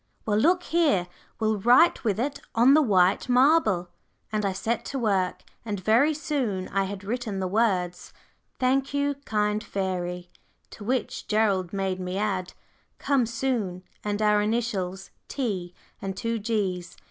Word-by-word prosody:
Well, 210 -1 +2
look 355 +8 +3
here, 310 - +2 0.3
we'll 220 -1 +1
write 250 - +5
with 210 -3 0
it 280 +3 -2 0.2
on 240 +4 +6
the 310 - +6
white 195 -3 +3
marble," 245 - +3 0.4
and 215 -1 -1
I - - 0
set 220 +5 -2
to 275 - -4
work, 195 -7 0 0.2
and 210 -3 -3
very 235 - +3
soon 250 - -2
I 195 0 0
had 195 0 -6
written 220 -1 -3
the 190 - -1
words, 185 -4 0 0.5
"Thank 270 +2 +1
you, 285 0 +1
kind 210 0 0
fairy," 180 -3 -3 0.4
to 210 - -10
which 250 +3 -2
Gerald 200 -5 +1
made 195 -2 -2
me 180 +1 -3
add, 195 -3 -2 0.4
"Come 270 -5 +1
soon," 230 -7 -2 0.2
and 210 0 -1
our 210 0 +4
initials, 205 -4 -2 0.2
"T" 190 -10 -3 0.3
and 190 -1 -4
two 230 0 -2
"G's." 200 -5 -2
210 Hz, 150 wpm, -26 LUFS, 190-245 Hz, 0.5 s, on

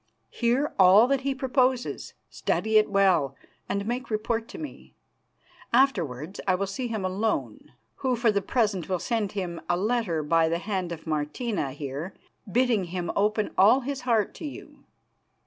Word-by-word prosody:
Hear 250 +5 0
all 190 +4 +8
that 275 -1 +2
he 275 0 -1
proposes, 260 -1 0
study 220 0 +1
it 215 - 0
well, 185 -9 +3 0.3
and 200 0 -1
make 245 +3 -3
report 225 +1 -1
to - - -10
me. 305 -2 -9 0.8
Afterwards 185 - +1
I 185 - +4
will 200 +2 -1
see 200 +6 -4
him 220 -5 -3
alone, 200 +4 -2 0.2
who 260 -2 0
for 235 -1 +2
the 200 -1 0
present 200 -5 0
will 185 - +1
send 220 0 -2
him 180 -4 -4
a 175 - +2
letter 200 -6 0
by 165 +2 +3
the 165 - 0
hand 185 -2 -3
of 165 -2 -7
Martina 155 - -2
here 145 +5 -6 0.4
bidding 240 -4 +2
him 175 0 -3
open 210 +1 +1
all 220 +8 +6
his 275 +1 -4
heart 230 -5 +1
to - - -8
you. 285 - -11
210 Hz, 165 wpm, -26 LUFS, 180-240 Hz, 0.8 s, all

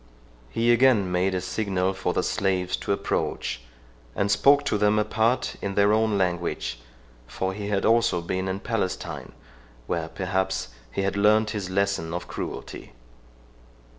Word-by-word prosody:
He 115 - +3
again 120 -7 +4
made 95 +1 +1
a 90 - -1
signal 95 0 -1
for 95 -2 -1
the 90 - 0
slaves 95 -3 0
to - - -4
approach, 100 -9 -1 0.5
and 100 0 +1
spoke 140 +6 +5
to 105 - 0
them 105 +1 +3
apart, 110 +4 +1
in 100 -1 -3
their 100 +1 +4
own 110 -1 +2
language; 85 -9 -1 0.5
for 95 +10 -3
he 105 +1 -5
also 110 0 +3
had 85 - -10
been 95 0 -1
in 95 +1 -3
Palestine, 100 -6 -3 0.5
where 80 +4 -2
perhaps, 95 +2 -2 0.2
he 95 - -2
had 100 0 0
learnt 105 +1 +4
his 100 -4 -4
lesson 95 -4 0
of 90 - -5
cruelty. - - -7
100 Hz, 150 wpm, -25 LUFS, 90-105 Hz, 0.5 s, spoke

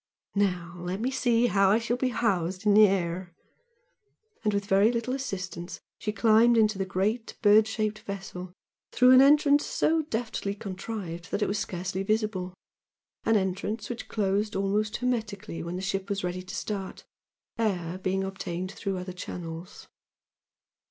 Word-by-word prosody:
"Now 180 -4 -1
let 180 +2 -3
me 250 +4 -1
see 240 -2 +2
how 195 -4 +4
I 210 - +5
shall 230 +1 -1
be 255 +1 0
housed 190 -6 -1
in 205 -1 +5
air!" 185 -4 +3 1.1
and 210 - +2
with 200 -1 -1
very 200 +3 +4
little 240 +1 -2
assistance 185 -9 -5 0.2
she 210 - -2
climbed 225 +2 +5
into 215 -3 +3
the 190 - -1
great 210 +6 -1
bird 215 +1 +6
shaped 215 -1 -2
vessel 190 -2 -7 0.4
through 250 0 +5
an 255 0 +9
entrance 290 +1 +5
so 320 0 +1
deftly 225 -7 -3
contrived 190 -4 -6
that 210 - 0
it - - +1
was 200 +1 -1
scarcely 185 0 -3
visible, 195 -3 -1 0.7
an 225 - +3
entrance 205 +4 -2
which 235 - -6
closed 205 0 0
almost 205 +2 0
hermetically 220 -7 -3
when 170 +1 -5
the 185 - -4
ship 195 0 -2
was 200 -1 -2
ready 180 +1 -2
to 185 - -8
start, 195 -3 -5 0.5
air 185 -5 -1
being 190 +1 -1
obtained 185 -1 -4
through 195 -1 -3
other 180 0 -6
channels. 175 0 -8
200 Hz, 155 wpm, -28 LUFS, 185-220 Hz, 1.1 s, an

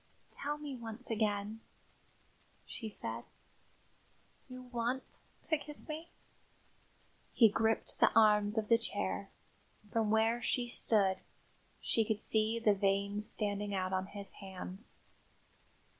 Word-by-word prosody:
"Tell 295 +1 -3
me 295 -2 -6
once 235 0 -2
again," 210 0 0 1.1
she 225 - -6
said. 115 - -4 1.3
"You 255 0 -8
want 245 +1 -3 0.2
to 315 - +1
kiss 295 0 -3
me?" 320 +2 -6 1.2
He 225 -3 +7
gripped 225 +2 0
the - - +6
arms 210 -1 +5
of 215 -1 0
his 230 0 +4
chair; 200 -1 -2 0.6
from 225 -2 +1
where 225 +2 +3
she 245 0 0
stood, 205 -5 +3 0.6
she 225 - +2
could 215 -1 -1
see 220 +1 +2
the 225 -2 +4
veins 200 +1 +1
standing 205 -1 -1
out 185 0 -1
on 185 0 0
his 200 -1 -3
hands. 190 +2 -9
220 Hz, 120 wpm, -34 LUFS, 200-235 Hz, 1.3 s, He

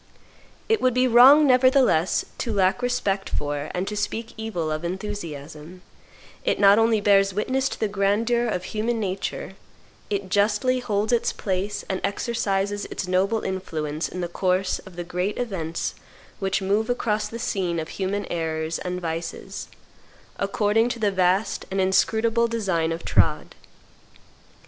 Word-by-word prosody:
It 445 -1 +2
would 255 -1 +2
be 255 0 +4
wrong, 260 +5 +8
nevertheless, 255 - +4
to 235 - -2
lack 195 +2 +2
respect 205 -6 -1
for 145 0 -3
and 180 +2 -2
to 210 - -3
speak 220 +2 -3
evil 195 -8 -3
of 155 +2 -3
enthusiasm: 170 -3 -6 0.6
it - - 0
not 200 +1 +6
only 225 -1 +3
bears 195 -1 +3
witness 260 +5 0
to - - -7
the 220 - +1
grandeur 210 +4 +1
of 180 -5 -2
human 225 +3 -2
nature, 190 -1 -3 0.6
it 200 -2 -2
justly 210 +6 +2
holds 215 -2 -1
its 235 - +2
place 195 +1 -3
and 190 -1 -2
exercises 205 -2 -1
its 185 - -5
noble 195 +5 +1
influence 160 -5 -3
in 180 - -5
the 175 - -2
course 185 +2 0
of 185 - -13
the 175 - -4
great 180 +4 -2
events 180 -9 -3 0.5
which 195 0 -1
move 210 +4 +1
across 215 -4 0
the 230 - -7
scene 185 -7 -1
of 160 - -5
human 200 +1 -2
errors 160 -1 -2
and 180 0 -4
vices, 165 +4 -5 0.7
according 210 +3 +2
to 240 - -3
the 210 -3 +1
vast 190 +2 +1
and 195 0 -2
inscrutable 220 +5 +2
design 190 -8 0
of 165 +1 -5
trod. - - +1
200 Hz, 150 wpm, -24 LUFS, 180-225 Hz, 0.7 s, wrong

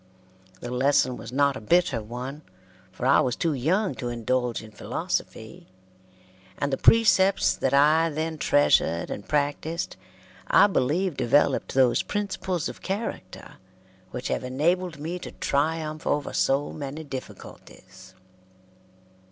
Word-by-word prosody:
The 120 - -6
lesson 130 0 +2
was 115 -1 -9
not 140 +1 +2
a 130 - -7
bitter 145 -1 +2
one, 125 +6 -7 0.5
for 120 - -6
I 135 - +5
was 125 -2 0
too 165 -2 0
young 180 - 0
to 120 - -3
indulge 120 0 -1
in 110 - -12
philosophy, - - -5 0.9
and 140 -1 -2
the - - +1
precepts 195 -4 +4
that 130 - -1
I 155 +4 +4
then 160 +1 -4
treasured 85 - +2
and 100 - -6
practised 150 +3 -2 0.5
I - - +6
believe 175 -1 0
developed 140 +3 +2
those 130 -3 +4
principles 190 -4 -3
of - - -9
character 200 +4 -6 0.5
which 125 - -5
have - - -2
enabled 160 +6 0
me 165 +5 -5
to - - -9
triumph 155 +2 -2
over 145 -1 -1
so 140 +2 +1
many 145 +1 -6
difficulties. 95 -8 -11
145 Hz, 130 wpm, -25 LUFS, 125-165 Hz, 0.9 s, I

